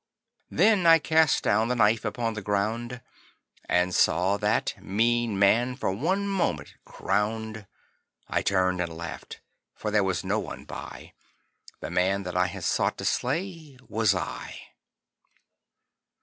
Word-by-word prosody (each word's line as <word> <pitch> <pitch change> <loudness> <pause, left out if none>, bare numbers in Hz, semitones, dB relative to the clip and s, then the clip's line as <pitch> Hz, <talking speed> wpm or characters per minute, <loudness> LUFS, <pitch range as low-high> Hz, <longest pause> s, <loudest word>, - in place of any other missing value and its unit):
Then 205 -6 +3
I 165 0 +9
cast 160 -1 +2
down 110 +2 +2
the 125 - 0
knife 110 -1 +3
upon 115 +1 -2
the 105 - -5
ground 110 +5 -2 0.7
And 90 +1 +2
saw 90 +6 +3
that 105 +2 0
mean 115 +2 +1
man 120 +6 +3
for 125 - -2
one 185 - -1
moment 195 -3 -1
crowned. 110 0 -2 0.6
I - - 0
turned 95 -2 +1
and 85 -2 -4
laughed: 85 0 -8 0.3
for 105 - -4
there 105 -1 +3
was 95 -2 -1
no - - 0
one - - -7
by - - -9 0.7
The - - -5
man 95 +2 +1
that 90 -1 -6
I 90 0 +3
had 95 -1 -7
sought - - 0
to - - -6
slay 160 +1 -2
was 110 -3 +2
I. 90 - -6
110 Hz, 140 wpm, -26 LUFS, 95-125 Hz, 0.7 s, I